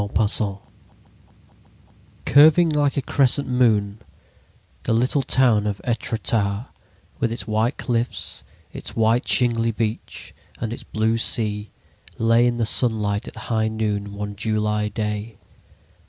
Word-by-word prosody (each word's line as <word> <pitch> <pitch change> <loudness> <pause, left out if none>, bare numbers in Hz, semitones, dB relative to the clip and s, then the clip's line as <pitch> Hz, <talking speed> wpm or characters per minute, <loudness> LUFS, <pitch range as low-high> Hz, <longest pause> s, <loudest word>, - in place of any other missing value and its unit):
THE 100 - -2
MODEL 105 -2 0 1.6
Curving 160 +4 +6
like 145 -2 +1
a 140 - 0
crescent 140 0 +2
moon, 110 -5 +2 0.8
the - - -1
little 125 +5 +2
town 120 -5 +2
of 100 -1 -3
Etretat, 115 -2 -1 0.5
with 115 - 0
its 115 - -5
white 110 +3 0
cliffs, 115 -6 -3 0.3
its - - -8
white, 115 +2 +2
shingly 115 -2 +2
beach 110 -1 -4 0.3
and 115 -1 -3
its - - -7
blue 110 +1 0
sea, 105 -2 -1 0.5
lay 115 +2 +4
in 120 -1 0
the 115 - +1
sunlight 110 -2 0
at - - -9 0.2
high 110 -1 +1
noon 105 -2 -2
one 105 0 -5
July 105 0 0
day. 105 +1 -4
110 Hz, 125 wpm, -22 LUFS, 105-120 Hz, 1.6 s, Curving